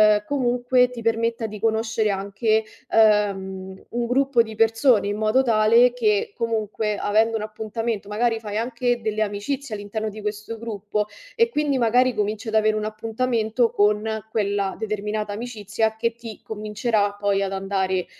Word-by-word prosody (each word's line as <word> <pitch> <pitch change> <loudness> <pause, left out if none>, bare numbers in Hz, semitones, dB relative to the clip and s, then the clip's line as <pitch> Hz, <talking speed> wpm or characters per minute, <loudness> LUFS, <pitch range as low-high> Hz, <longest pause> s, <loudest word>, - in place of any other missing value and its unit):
ehm, 210 - -2
comunque 250 -1 +2
ti 245 -2 -8
permetta 230 0 0
di 210 0 -8
conoscere 220 0 +1
anche, 200 +3 0 0.3
ehm, 195 -3 +1
un 240 0 -2
gruppo 265 0 +3
di 220 -1 -4
persone, 225 0 +3
in 205 +1 -2
modo 215 +5 +3
tale 230 +1 +5
che 210 -5 +1
comunque, 215 -2 -1
avendo 220 +3 +2
un 215 - -4
appuntamento, 215 0 -4
magari 225 +2 0
fai 210 -2 -5
anche 240 +1 -1
delle 215 -1 -2
amicizie 215 +5 -2
all'interno 210 +1 -4
di 215 +1 -9
questo 210 +2 -5
gruppo 210 -2 -3 0.3
e 465 0 +3
quindi 295 - 0
magari 250 +1 +3
cominci 215 +1 -2
ad - - -6
avere 215 0 +3
un 215 - -2
appuntamento 225 +1 0
con 210 +1 +1
quella 200 -2 0
determinata 210 -1 -3
amicizia, 220 -1 -2
che 230 +1 0
ti 230 -2 -10
convincerà 210 -1 -1
poi 200 -1 +1
ad 195 - -2
andare 190 -1 -1
220 Hz, 155 wpm, -23 LUFS, 210-230 Hz, 0.3 s, tale